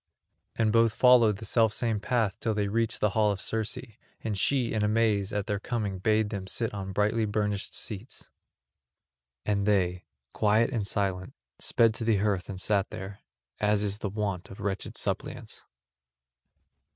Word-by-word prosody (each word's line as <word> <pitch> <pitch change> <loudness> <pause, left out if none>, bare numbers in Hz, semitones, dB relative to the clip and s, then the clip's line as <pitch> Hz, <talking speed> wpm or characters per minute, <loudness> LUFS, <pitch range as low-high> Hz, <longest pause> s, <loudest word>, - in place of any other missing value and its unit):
And 110 -2 +2
both 115 -1 +4
followed 120 -5 +5
the 110 - -8
selfsame 110 -1 +2
path 105 -2 0
till 110 -2 -1
they 105 -1 0
reached 115 +2 0
the 105 - +3
hall 105 +1 +3
of 100 - -3
Circe, 110 +1 -2 0.4
and 110 -2 -2
she 120 +5 +1
in 110 -1 0
amaze 105 -2 +2
at 105 -2 -1
their 105 -3 -2
coming 105 -5 -3
bade 110 +2 +2
them 100 -3 -4
sit 115 +3 -2
on 95 -1 -5
brightly 105 +3 +1
burnished 105 -1 -1
seats. 110 +2 -6 1.1
And 100 -1 0
they, 90 -3 +1 0.3
quiet 110 +3 +3
and 110 -6 -1
silent, 95 -3 -2 0.2
sped 115 -1 +3
to 115 - -5
the 110 -2 +3
hearth 100 -2 0
and 95 -2 -5
sat 100 0 +1
there, 95 +1 -7 0.4
as 105 0 +2
is 100 0 -1
the 100 - -3
wont 100 -2 -3
of 95 - -11
wretched 100 +2 -3
suppliants. 120 +4 -3
105 Hz, 165 wpm, -28 LUFS, 100-110 Hz, 1.1 s, followed